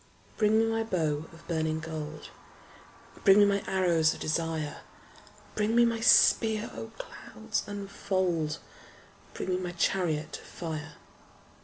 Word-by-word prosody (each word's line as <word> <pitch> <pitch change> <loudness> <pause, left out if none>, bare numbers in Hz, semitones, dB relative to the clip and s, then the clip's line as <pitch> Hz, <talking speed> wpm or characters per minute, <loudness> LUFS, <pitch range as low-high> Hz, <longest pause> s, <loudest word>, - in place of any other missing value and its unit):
Bring 215 0 +3
me 225 - +4
my 225 0 0
bow 160 -8 -1
of 165 - -16
burning 160 -2 -1
gold: 155 -1 -6 0.9
Bring 195 -1 +7
me 205 - +7
my 200 0 +1
arrows 170 -4 +2
of - - -11
desire: 160 -1 -2 0.7
Bring 215 +2 0
me 235 0 +6
my 230 -1 0
spear: 220 -1 +4
O 225 - -7
clouds 220 -2 -5
unfold! 190 -5 -2 0.8
Bring - - -4
me 180 - +1
my 180 -1 -4
chariot 170 -3 -1
of - - -15
fire. 160 -2 -6
180 Hz, 135 wpm, -29 LUFS, 160-210 Hz, 0.9 s, Bring